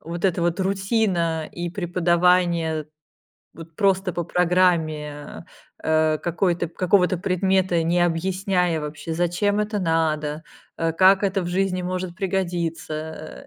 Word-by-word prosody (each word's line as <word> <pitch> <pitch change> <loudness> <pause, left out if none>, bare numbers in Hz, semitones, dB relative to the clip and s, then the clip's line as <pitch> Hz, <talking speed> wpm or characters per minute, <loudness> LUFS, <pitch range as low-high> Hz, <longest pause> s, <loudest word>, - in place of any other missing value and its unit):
вот 170 +2 -7
эта 180 -2 +1
вот 170 +1 0
рутина, 190 -5 0
и 175 0 -5
преподавание 175 -3 +1 0.7
вот 165 0 -12
просто 190 -1 +1
по 175 - -2
программе, 165 -5 0 0.4
э, 155 -1 +2
какой 175 +1 0
какого-то 180 +2 +1
предмета, 185 -1 +1
не 170 +2 +1
объясняя 180 0 0
вообще, 150 +2 -5
зачем 175 +5 0
это 210 0 -1
надо, 160 -3 -1 0.3
э, 165 0 0
как 190 +3 +5
это 195 -1 +1
в 175 - -4
жизни 185 0 0
может 180 -1 -4
пригодиться, 170 -4 -4
175 Hz, 120 wpm, -23 LUFS, 165-185 Hz, 0.7 s, как